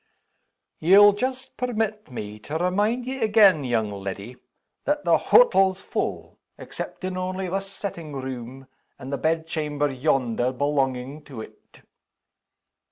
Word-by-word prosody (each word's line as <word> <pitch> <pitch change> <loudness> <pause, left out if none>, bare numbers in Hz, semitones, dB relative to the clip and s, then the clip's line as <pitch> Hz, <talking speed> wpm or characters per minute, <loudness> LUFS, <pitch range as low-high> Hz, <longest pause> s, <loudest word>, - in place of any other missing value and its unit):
"YE'LL 200 +5 +7
just 260 +4 -4
permit 220 -4 -2
me 105 -4 -7
to 150 +9 -4
remind 205 +8 0
ye 260 0 -4
again, 205 -8 +5
young 115 -4 0
leddy, 100 +4 -6 0.5
that 295 0 -1
the - - +5
hottle's 195 - +4
full - - -4 0.2
exceptin' 185 -1 -6
only 185 +1 -3
this 195 +2 -3
settin' 170 -7 -6
room, 130 0 -6 0.3
and 135 +2 -7
the 140 - -2
bedchamber 155 -2 -1
yonder 125 -3 0
belonging 135 +1 -1
to 130 -6 -8
it." - - -15
160 Hz, 120 wpm, -24 LUFS, 130-200 Hz, 0.5 s, YE'LL